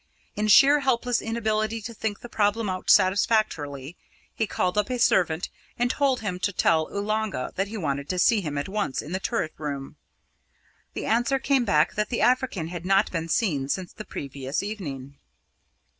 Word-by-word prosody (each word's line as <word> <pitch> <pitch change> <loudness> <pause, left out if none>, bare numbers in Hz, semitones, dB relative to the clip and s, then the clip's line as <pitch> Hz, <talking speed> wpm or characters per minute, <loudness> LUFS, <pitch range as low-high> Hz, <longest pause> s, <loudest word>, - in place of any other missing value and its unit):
In 210 +1 -1
sheer 275 +7 +7
helpless 250 -3 +1
inability 220 -1 -1
to 235 - -6
think 215 -2 -4
the - - -8
problem 215 0 0
out 185 0 -5
satisfactorily, 175 - +2 0.4
he 220 - -1
called 180 -1 -1
up 210 +2 +1
a 250 - -1
servant 180 -7 +2 0.3
and 245 +1 +1
told 270 -3 +1
him 190 -4 -3
to 200 +2 0
tell 160 -4 +2
Oolanga 210 -7 -2
that 195 +1 -1
he 220 +2 -6
wanted 140 -5 -3
to 185 - -1
see 210 +4 +4
him 150 -5 -4
at 140 - -2
once 200 -8 -2
in 150 - -9
the 190 - -1
turret 195 -6 -2
room. 140 -3 -5 1.0
The - - -4
answer 240 +4 +2
came 265 -2 +1
back 155 -5 +3
that 210 0 -1
the 240 - -1
African 245 -10 +1
had 175 -1 -6
not 195 +2 +2
been 165 -2 -3
seen 150 - 0
since 180 +3 -3
the 215 - -8
previous 140 -2 -4
evening. 140 -10 -6
200 Hz, 180 wpm, -25 LUFS, 160-225 Hz, 1.0 s, sheer